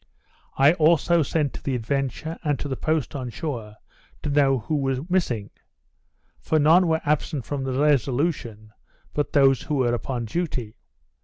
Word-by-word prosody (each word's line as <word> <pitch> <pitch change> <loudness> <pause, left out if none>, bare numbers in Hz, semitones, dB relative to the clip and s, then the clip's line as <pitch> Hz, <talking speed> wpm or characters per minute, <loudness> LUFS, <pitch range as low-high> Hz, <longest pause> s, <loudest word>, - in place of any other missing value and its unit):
I 140 +3 +6
also 170 +1 +3
sent 150 -1 0
to - - -8
the 135 - -2
Adventure, 135 +6 -3
and 145 -3 0
to 145 - -5
the 135 - -2
post 155 -1 -1
on 130 -3 -4
shore, 115 -7 -5 0.5
to 150 - -1
know 140 -2 +3
who 125 +7 -3
were 135 -2 -1
missing; 125 - -1 0.9
for 160 - 0
none 165 +4 +5
were 160 -1 +1
absent 145 -3 -1
from 140 -2 -3
the 130 0 -2
Resolution 135 -6 0 0.4
but 145 - -2
those 135 -3 +4
who 150 - -3
were 125 -3 +1
upon 120 0 -3
duty. 125 -5 -3
140 Hz, 160 wpm, -24 LUFS, 125-155 Hz, 0.9 s, I